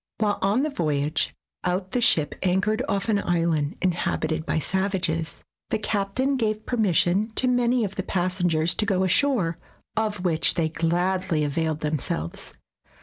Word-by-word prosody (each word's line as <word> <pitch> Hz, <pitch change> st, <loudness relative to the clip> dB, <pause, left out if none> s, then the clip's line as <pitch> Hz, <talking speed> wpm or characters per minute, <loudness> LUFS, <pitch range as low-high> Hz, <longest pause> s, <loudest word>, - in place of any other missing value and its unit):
While 210 Hz, -2 st, 0 dB
on 205 Hz, +7 st, +2 dB
the 305 Hz, -, -1 dB
voy 150 Hz, -, 0 dB
age 155 Hz, +2 st, -1 dB, 0.3 s
out 185 Hz, +1 st, -1 dB
the 245 Hz, -, 0 dB
ship 155 Hz, -9 st, +3 dB
anchored 190 Hz, +4 st, +1 dB
off 200 Hz, 0 st, -1 dB
an 210 Hz, -3 st, +2 dB
island 165 Hz, -5 st, 0 dB
inhabited 160 Hz, -3 st, -1 dB
by -, -, 0 dB
savages. 170 Hz, 0 st, -1 dB, 0.3 s
The -, -, +1 dB
captain 215 Hz, +6 st, 0 dB
gave 215 Hz, -2 st, -1 dB
permission 205 Hz, -2 st, +2 dB
to 255 Hz, -, +2 dB
many 245 Hz, -1 st, +2 dB
of 200 Hz, -2 st, -3 dB
the -, -, +1 dB
passengers 175 Hz, -3 st, +1 dB
to 210 Hz, -, -1 dB
go 190 Hz, -2 st, +2 dB
ashore, 190 Hz, -4 st, +2 dB, 0.4 s
of 210 Hz, -4 st, -1 dB
which 160 Hz, -3 st, +2 dB
they 160 Hz, -2 st, +1 dB
gladly 175 Hz, 0 st, 0 dB
availed 155 Hz, +1 st, -1 dB
them 150 Hz, -1 st, 0 dB
selves. 80 Hz, -7 st, -4 dB
185 Hz, 155 wpm, -25 LUFS, 160-210 Hz, 0.4 s, ship